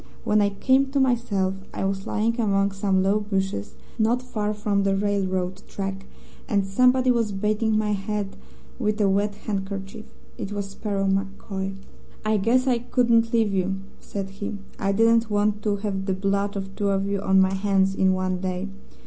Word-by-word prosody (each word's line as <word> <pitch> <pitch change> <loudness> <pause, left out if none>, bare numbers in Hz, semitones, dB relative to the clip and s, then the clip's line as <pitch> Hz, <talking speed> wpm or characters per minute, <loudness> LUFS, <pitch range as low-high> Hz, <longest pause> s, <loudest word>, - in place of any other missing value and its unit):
When 210 0 +3
I 200 - +3
came 260 +7 +2
to 280 - +2
myself 230 -7 +1 0.2
I - - -1
was 195 0 -2
lying 230 +3 0
among 200 -2 +2
some 195 -1 +1
low 200 +2 +3
bushes, 195 - -2 0.2
not 235 +3 +2
far 210 -4 -2
from 210 -1 0
the 195 0 +2
railroad 190 -2 -1
track, 195 0 -5 0.4
and 200 -2 +2
somebody 250 +5 +4
was 230 -3 +1
bathing 215 +2 +1
my 215 -1 +1
head 205 0 -2 0.4
with 215 -2 0
a 205 - +4
wet 200 +1 +1
handkerchief. 195 0 -5 0.3
It 200 - -4
was 200 -1 -3
Sparrow 200 -1 -2
MacCoy. 195 0 -2 0.5
"'I 215 0 +3
guess 235 +6 +2
I 250 -3 +2
couldn't 235 -1 +2
leave 225 -3 +2
you,' 190 0 0 0.2
said 195 -1 -5
he. 200 +1 -5 0.2
'I 195 - +1
didn't 230 +2 +4
want 210 0 +1
to 210 -1 +1
have 195 -1 -3
the 190 - +1
blood 200 +1 0
of 195 0 -5
two 200 -1 0
of 195 0 +1
you 200 -1 -1
on 190 -1 +4
my 190 0 +4
hands 195 -1 +2
in 190 -1 +3
one 185 0 -1
day. 185 +1 -2
200 Hz, 180 wpm, -24 LUFS, 195-215 Hz, 0.5 s, somebody